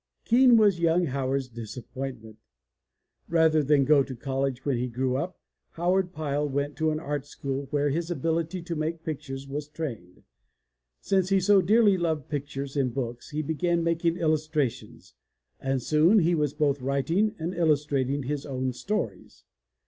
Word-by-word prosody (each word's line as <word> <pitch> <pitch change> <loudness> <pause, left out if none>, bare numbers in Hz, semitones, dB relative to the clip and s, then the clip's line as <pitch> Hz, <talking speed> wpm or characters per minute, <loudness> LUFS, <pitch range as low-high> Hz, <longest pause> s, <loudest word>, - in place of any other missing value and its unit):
Keen 245 0 +6
was 205 -5 +4
young 170 +1 +3
Howard's 135 -1 -1
disappointment. 115 0 -8 0.9
Rather 160 -2 +4
than 145 -1 +3
go 145 0 +5
to 135 -1 -4
college 135 0 -2
when 140 -3 +1
he 125 +1 -1
grew 125 +1 -1
up, 170 +7 -3 0.3
Howard 180 +2 +1
Pyle 150 -3 -2
went 140 +1 -2
to 160 0 +1
an 155 0 -1
art 145 -2 -3
school 140 -1 -4
where 145 0 +1
his 165 +3 -2
ability 165 +2 -1
to 170 -1 -4
make 160 +1 -3
pictures 140 -3 -5
was 145 +1 -4
trained. 120 - -7 0.8
Since 190 -1 +1
he 195 -1 +4
so 195 +1 +5
dearly 205 +1 +4
loved 160 -5 -1
pictures 140 -1 -4
in 135 -3 +1
books 120 -1 -5
he 155 +1 -3
began 170 +3 0
making 170 0 +1
illus 155 -2 +1
trations 120 - -3 0.5
and 135 -2 -1
soon 160 - +4
he 175 -3 +3
was 150 -3 0
both 145 -3 +1
writing 160 - 0
and 165 +3 -3
illustrating 145 -4 +1
his 145 +2 -3
own 130 -2 -3
stories. 125 - -4
150 Hz, 160 wpm, -27 LUFS, 135-170 Hz, 0.9 s, Keen